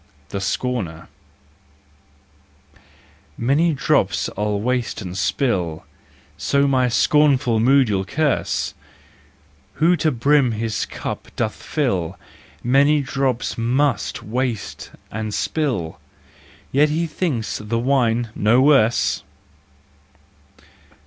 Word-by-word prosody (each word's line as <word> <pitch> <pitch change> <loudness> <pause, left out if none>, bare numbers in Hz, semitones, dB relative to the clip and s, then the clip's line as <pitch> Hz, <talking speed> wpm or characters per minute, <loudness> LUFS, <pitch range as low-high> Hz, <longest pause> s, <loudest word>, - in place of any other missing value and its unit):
The 100 - -4
Scorner. 95 -6 -3 2.3
Many 145 +7 +2
drops - - +1
I 105 - -4
waste 115 +4 -1
and 90 -4 -6
spill, 95 - -1 0.5
So 140 0 +2
my 130 -2 +2
scornful 135 -3 +3
mood 135 +3 +4
you 100 -3 0
curse: 150 +8 -1 1.0
Who 170 +3 +3
to 155 +1 +2
brim 135 0 +2
his 110 -1 -2
cup - - -6
doth 110 - -1
fill, 95 - -1 0.5
Many 140 +4 +4
drops 135 -4 -2
must 125 +1 0
waste 120 0 -3 0.2
and 110 -1 -4
spill— 120 - -2 0.7
Yet 145 +3 +4
he 160 +3 0
thinks 150 -8 -2
the 105 +2 -2
wine 120 -2 +1
no 110 +4 +3
worse. 130 -5 +3
125 Hz, 95 wpm, -21 LUFS, 110-140 Hz, 2.3 s, mood